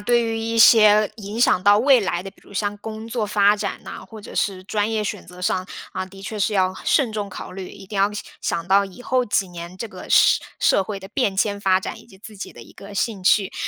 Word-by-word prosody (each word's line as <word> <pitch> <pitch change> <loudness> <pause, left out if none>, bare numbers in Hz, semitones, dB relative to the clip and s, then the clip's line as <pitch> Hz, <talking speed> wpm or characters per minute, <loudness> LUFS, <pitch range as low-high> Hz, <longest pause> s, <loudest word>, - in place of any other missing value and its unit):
对 240 +3 +2
于 225 0 -2
一 230 0 -2
些 215 -2 +7
影 215 +1 -6
响 185 -6 +4
到 205 +1 +6
未 260 +2 +5
来 180 -3 -2
的， 195 - -8
比 - - -26
如 - - -17
像 205 +1 -1
工 220 +1 -7
作 230 -1 -2
发 205 0 +4
展 205 - -4
呐， - - -8
或 220 -1 -11
者 205 - -11
是 185 -2 -1
专 210 +2 -1
业 215 -1 -1
选 205 -1 -5
择 180 +1 -12
上， 185 0 0 0.3
啊， 185 - -4
的 195 +1 -13
确 215 +1 -5
是 210 +1 0
要 185 -1 +2
慎 255 -7 +2
重 210 -2 -3
考 - - -8
虑， 185 0 -7
一 195 - -12
定 205 - -7
要 200 +1 +3 0.3
想 170 - -2
到 195 +2 +4
以 195 +6 -13
后 255 0 +1
几 200 -2 0
年 175 +1 -9
这 230 - -5
个 - - -11
社 - - +5 0.2
社 - - +3
会 200 +1 -5
的 190 - -10
变 205 -5 -1
迁 200 0 0
发 190 -2 +3
展 220 - -6
以 - - -19
及 205 -5 -17
自 210 +2 -12
己 - - -7
的 - - -12
一 - - -16
个 200 +1 -12
兴 200 -2 -2
趣。 195 +1 +3
205 Hz, 275 characters per minute, -22 LUFS, 190-220 Hz, 0.3 s, 些